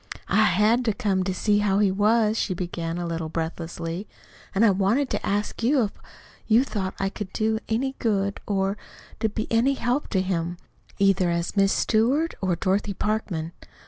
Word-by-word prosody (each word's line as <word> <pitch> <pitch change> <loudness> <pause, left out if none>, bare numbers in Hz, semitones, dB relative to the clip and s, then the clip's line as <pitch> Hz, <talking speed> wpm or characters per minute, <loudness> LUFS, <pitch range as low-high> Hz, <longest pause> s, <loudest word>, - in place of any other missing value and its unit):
"I 215 +2 +4
HAD 215 +6 +3
to 220 - +2
come 195 -2 0
to 190 - 0
see 205 +2 +1
how 200 -2 +2
he 205 -2 +3
was," 215 +2 +3
she 190 -4 -1
began, 170 -1 -4
a 175 - -3
little 165 -1 -3
breathlessly. 165 +3 -4 0.5
"And 210 +4 +5
I 210 - +6
wanted 205 +9 +1
to - - -2
ask 205 +3 -1
you 255 +2 +3
if 205 - -2 0.6
you 230 +3 +5
thought 195 -7 -3
I 195 - +1
could 195 -1 -7
do 220 0 0
any 260 +4 0
good 200 -3 0
or 195 0 0 0.4
or 220 - +2
be 215 +1 -3
any 240 +5 +3
help 245 +3 -1
to 190 - +1
him, 175 -2 -2 0.4
either 195 -2 +3
as 170 +2 -2
Miss 195 -1 +4
Stewart 260 +9 +2
or 185 -2 +1
Dorothy 195 +3 0
Parkman. 185 -7 -2
200 Hz, 180 wpm, -25 LUFS, 185-220 Hz, 0.6 s, I